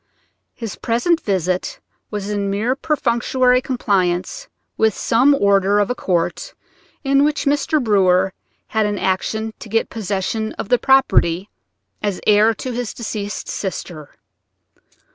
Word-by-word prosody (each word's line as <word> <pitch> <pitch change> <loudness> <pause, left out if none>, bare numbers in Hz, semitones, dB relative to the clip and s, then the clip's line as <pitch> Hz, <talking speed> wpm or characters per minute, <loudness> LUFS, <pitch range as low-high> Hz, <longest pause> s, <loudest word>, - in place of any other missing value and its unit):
His 225 -4 -6
present 260 +9 +1
visit 185 -2 -1 0.3
was 205 -2 -4
in 205 -1 -2
mere 215 +6 0
perfunctory 255 -3 +1
compliance 200 - -1 0.3
with 220 -2 +2
some 260 +5 +3
order 200 0 +3
of 205 +3 +1
a - - +2
court 195 - -2 0.5
in 275 0 +3
which 300 0 0
Mr. 290 +2 +1
Brewer 190 -5 +3 0.4
had 220 -1 +1
an 205 0 -2
action 220 +4 -1
to 220 - -10
get 225 +2 0
possession 215 +1 -2
of - - -6
the 245 - +4
property 200 -8 +3 0.5
as 205 -3 -2
heir 215 +2 +4
to 255 - -5
his 240 -2 -4
deceased 210 -3 -5
sister. 175 -6 -6
215 Hz, 130 wpm, -19 LUFS, 195-250 Hz, 0.5 s, the